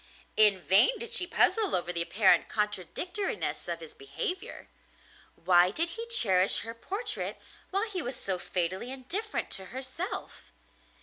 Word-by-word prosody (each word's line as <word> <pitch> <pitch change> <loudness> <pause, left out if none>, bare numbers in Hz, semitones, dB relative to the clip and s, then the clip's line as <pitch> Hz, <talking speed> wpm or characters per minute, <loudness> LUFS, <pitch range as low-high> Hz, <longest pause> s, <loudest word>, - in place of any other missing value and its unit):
In 210 -3 +5
vain 195 - +6
did 465 +1 -3
she 370 -7 +8
puzzle 420 +3 +2
over 175 0 -2
the 170 - -2
apparent 195 +3 +2
contradictoriness 210 - -3
of - - -5
his 470 -2 -11
behaviour. 415 -2 -6 0.7
Why 175 0 +3
did 330 - 0
he 460 +5 -7
cherish 195 - +3
her 230 - -7
portrait 415 - -5 0.3
while 395 +4 -1
he 385 -4 -4
was 250 -2 -5
so 190 -5 -2
fatally 185 +6 -2
indifferent 355 - -5
to 190 - -3
herself? 260 - -7
260 Hz, 140 wpm, -28 LUFS, -, 0.7 s, she